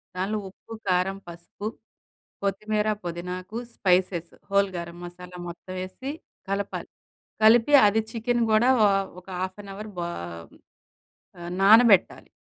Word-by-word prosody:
దానిలో 195 +4 -1
ఉప్పు, 200 - -13
కారం, 185 +1 +1
పసుపు, 175 +4 -8 0.8
కొత్తిమీర, 210 +2 0 0.2
పుదీనాకు, 180 +4 -5 0.2
స్పైసెస్, 180 -2 +1 0.2
హోల్ 200 0 +3
గరం 170 0 -6
మసాలా 180 0 -10
మొత్తం 175 +2 -8
వేసి 225 +9 -6 0.4
కలపాలి. 200 0 -3 0.5
కలిపి 230 +5 +6
అది 215 +2 +2
చికెన్ 240 +1 0
కూడా 220 +4 +4 0.2
ఓ - - +7 0.3
ఒక 180 - -34
హాఫ్ 185 +2 -4
అన్ 200 - -9
అవర్ 215 +2 -7
బో 175 - -2 1.4
ఆహ్, 175 - -6
నానబెట్టాలి. 215 -1 +6
195 Hz, 120 wpm, -26 LUFS, 180-215 Hz, 1.4 s, ఓ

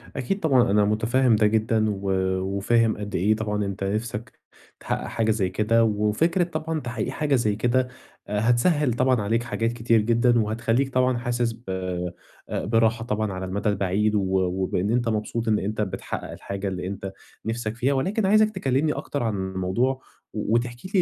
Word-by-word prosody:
أكيد 135 +10 -2
طبعًا، 130 - +3
أنا 105 0 +4
متفهم 115 +3 +2
ده 105 0 +4
جدًا، 110 0 +1
و 100 -1 -2 0.3
وفاهم 110 +4 +1
قد 105 0 -5
إيه 105 +5 +3
طبعًا 105 -1 -2
أنت 100 0 -4
نفسك 110 +3 -3 0.4
تحقق - - -3
حاجة 110 -1 0
زي 100 -4 0
كده، 115 +4 +2
وفكرة 110 - +2
طبعًا 160 -1 -3
تحقيق 120 -5 -3
حاجة 145 -3 0
زي 110 -4 +1
كده، 125 +3 +1 0.4
هتسهِّل 120 - +2
طبعًا 125 -2 +2
عليك 115 +3 0
حاجات 115 0 -1
كتير 115 -2 +2
جدًا، 120 +2 +3
وهتخلّيك 115 +5 0
طبعًا 130 -1 +2
حاسس 120 -1 -1
ب 115 +2 -17 0.9
براحة 115 +1 +1
طبعًا 105 -3 -1
على 95 0 -4
المدى 100 +3 -1
البعيد، 100 +2 +1
و 100 - +3 0.2
وبإن 95 +2 0
أنت 120 -1 +1
مبسوط 110 +1 -2
إن 110 -1 +3
أنت 105 +2 -2
بتحقق 95 - -4
الحاجة 100 0 -5
اللي 90 -1 -3
أنت 95 0 -5 0.3
نفسك 115 -1 -3
فيها، 130 +4 +1
ولكن 190 +10 0
عايزك 215 +2 +5
تكلمني 140 +4 +1
أكتر 140 -4 -4
عن 110 -3 0
الموضوع، 95 +8 -1 0.3
و 110 - -2
وتحكي 120 +6 -2
لي 185 - +5
115 Hz, 170 wpm, -24 LUFS, 105-125 Hz, 0.9 s, عايزك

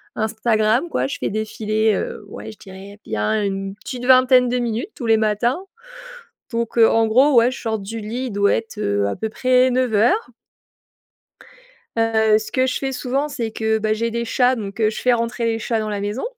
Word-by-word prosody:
Instagram 220 +5 +1
quoi, - - -1
je 280 - -5
fais - - -2
défiler, 215 +1 -1
heu, 205 - -4
ouais, 205 - -9
je 215 - -15
dirais 195 +2 -12
bien, 110 - -1
une 195 0 -3
petite 245 +3 -7
vingtaine 255 -1 +5
de 250 - 0
minutes 240 - -2
tous 250 - -6
les 225 -1 +4
matins. 220 +6 0 0.9
Donc 230 0 -3
heu, 225 - +7
en 225 0 +2
gros, 260 +7 +4
ouais, 235 +2 +5
je 260 - -8
sors 220 -2 -1
du 210 +3 -6
lit, 235 +5 -4
il - - -6
doit 200 0 +2
être, 225 -1 -5
heu, 100 - 0
à 100 - -2
peu 220 - -3
près 255 +3 +3
9:00. 250 - +1 1.7
Heu, 220 -1 +3
ce 215 0 -6
que 260 0 +1
je - - -1
fais 270 -1 -3
souvent 265 +2 -2
c'est 245 -7 -4
que, 220 0 0
bah 215 0 0
j'ai 230 +1 -2
des 235 +1 -2
chats 250 +2 +2
donc 205 -2 -7
heu, 215 -1 +3
je 215 - -6
fais 250 - +3
rentrer 235 0 -2
les 225 0 0
chats 225 0 -1
dans 215 0 -3
la 205 -1 -3
maison, 205 +5 -3
225 Hz, 210 wpm, -20 LUFS, 215-250 Hz, 1.7 s, heu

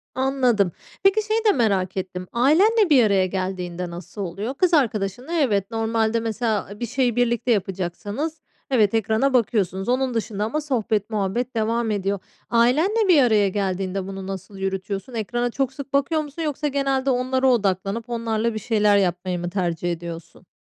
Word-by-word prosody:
Anladım. 255 -7 +2 0.3
Peki, 390 +3 +4
şeyi 440 +1 +2
de 425 - +6
merak 195 - 0
ettim; 185 -1 -4
ailenle 370 - +4
bir 270 -5 +6
araya 200 -3 +3
geldiğinde 180 -2 -3
nasıl 175 +4 -8
oluyor? 200 +7 -4
Kız 355 +5 +1
arkadaşınla 245 - 0
evet, 220 - +1
normalde 225 0 0
mesela 220 -2 -2
bir 240 - -2
şeyi 245 0 0
birlikte 240 0 +1
yapacaksanız 205 - -2 0.3
evet, 220 -6 +3
ekrana 225 +5 +1
bakıyorsunuz. 200 -5 +1
Onun 255 0 +1
dışında 215 -2 -2
ama 305 +8 -2
sohbet 225 -8 -1
muhabbet 220 +4 -2
devam 225 +1 0
ediyor. 200 -1 -1 0.3
Ailenle 310 - +3
bir 320 -7 +6
araya 215 -4 +3
geldiğinde 190 -1 -2
bunu 195 -1 -6
nasıl 195 +1 -7
yürütüyorsun? 195 +3 -4
Ekrana 240 +2 -2
çok 265 +1 -1
sık 275 0 -9
bakıyor 280 +3 +2
musun 300 +2 -7
yoksa 300 -1 -1
genelde 275 -1 0
onlara 260 +1 +1
odaklanıp 205 -1 0
onlarla 230 -1 -1
bir 215 - -3
şeyler 210 -2 +3
yapmayı 180 -1 0
mı 175 0 -3
tercih 175 -2 -1
ediyorsun? 170 +1 -8
225 Hz, 155 wpm, -23 LUFS, 195-260 Hz, 0.3 s, de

